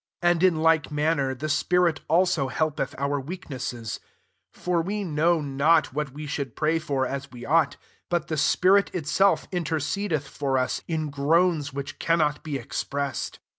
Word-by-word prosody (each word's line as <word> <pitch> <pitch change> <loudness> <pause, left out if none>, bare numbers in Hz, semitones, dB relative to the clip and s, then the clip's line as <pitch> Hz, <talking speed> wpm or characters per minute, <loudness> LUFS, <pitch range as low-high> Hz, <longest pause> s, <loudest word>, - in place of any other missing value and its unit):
26 175 0 +5
And 170 - -2
in 155 - -2
like 160 -2 +3
manner, 150 -3 0
the 145 +5 -4
spirit 170 +2 +2
also 175 -4 +2
helpeth 155 +3 -1
our 140 +1 -1
weak 165 +5 -8
nesses: 120 -4 -4 0.5
for 175 -2 -1
we 205 +4 -3
know 165 0 +2
not 145 +2 +2
what 150 -1 -2
we 150 +3 -7
should 140 -4 -4
pray 160 +1 +1
for 140 -5 -1
as 140 +2 -4
we 120 -1 -10
ought: 155 -1 +2 0.3
but 175 -3 0
the 160 - -2
spirit 185 +7 +4
itself 185 +4 +2
intercedeth 160 -1 -1
[for 135 -2 -1
us] 130 0 -1
in 155 -3 -2
groans 150 +1 +2
which 140 +1 -6
cannot 155 -3 +1
be 150 -3 -3
expressed. 140 +2 -3
155 Hz, 165 wpm, -25 LUFS, 140-170 Hz, 0.5 s, 26